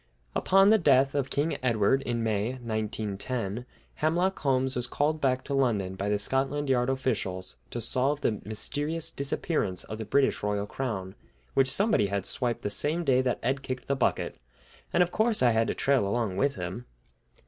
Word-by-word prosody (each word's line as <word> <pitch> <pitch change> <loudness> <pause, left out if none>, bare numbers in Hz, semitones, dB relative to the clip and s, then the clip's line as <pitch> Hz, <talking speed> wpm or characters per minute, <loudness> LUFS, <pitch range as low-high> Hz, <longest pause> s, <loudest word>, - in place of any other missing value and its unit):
Upon 195 +2 +4
the 220 - +5
death 135 -4 +4
of 140 -2 -1
King 150 +3 -1
Edward 120 +1 +2
in 120 -3 -2
May, 110 +2 0
1910, 110 -1 -3 0.3
Hemlock 175 +5 +1
Holmes 130 -2 +1
was 125 -1 -2
called 155 +4 0
back 130 -1 +1
to 140 - -4
London 110 -9 +1
by 100 +2 -3
the 105 - +2
Scotland 135 +6 -1
Yard 125 0 +2
officials 110 -9 -2
to 120 - -4
solve 130 +5 0
the 105 -5 0
mysterious 150 +9 -1
disappearance 140 - 0
of 110 - -7
the 110 - -4
British 135 +6 +2
royal 105 0 -1
crown, 105 -6 -4 0.4
which 135 -1 +4
somebody 190 - +3
had 100 -1 -2
swiped 120 -2 -1
the 105 - -2
same 155 +10 0
day 130 -4 +3
that 125 -2 0
Ed 135 +3 0
kicked 130 -1 -5
the 140 - +1
bucket; 130 - 0 0.5
and 180 - +4
of 175 - -4
course 220 - +2
I 120 - +5
had 115 +1 +2
to - - -1
trail 135 -7 +2
along 110 -2 -1
with 140 +7 +1
him! 90 +7 -6
130 Hz, 180 wpm, -28 LUFS, 110-140 Hz, 0.5 s, the